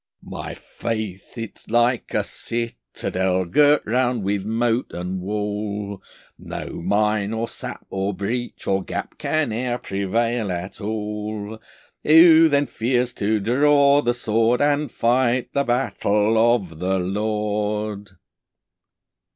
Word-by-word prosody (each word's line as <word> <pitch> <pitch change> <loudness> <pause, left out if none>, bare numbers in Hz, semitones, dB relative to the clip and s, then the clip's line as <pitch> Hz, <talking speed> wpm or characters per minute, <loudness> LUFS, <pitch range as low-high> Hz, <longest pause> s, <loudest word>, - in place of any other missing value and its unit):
My - - -6
faith 110 -3 -5
is 115 -2 -8
like 120 +1 +1
a - - +2
citadel 95 -6 -3
Girt 145 - +4
round 120 0 +1
with 100 0 -1
moat 115 +3 0
and 90 +1 -4
wall, 105 0 -3 0.4
No - - -6
mine, 105 +2 +1
or 115 +1 -2
sap, - - -8
or 95 +1 -1
breach, 110 +6 -4
or 95 0 +1
gap - - -6
Can 155 -6 0
ere 120 +1 -1
prevail 110 +2 -1
at 90 +4 -5
all. 105 0 -4 0.4
Who 160 +1 +7
then 145 0 +3
fears 125 0 0
to 105 +2 0
draw 140 +5 +4
the 120 -3 0
sword, 115 0 +2
And 145 -1 +1
fight 120 +1 +1
the 140 - +2
battle 110 -3 +1 0.2
of 90 -9 -6
the 95 +2 0
Lord? 105 +1 -2
110 Hz, 120 wpm, -22 LUFS, 100-120 Hz, 0.4 s, Who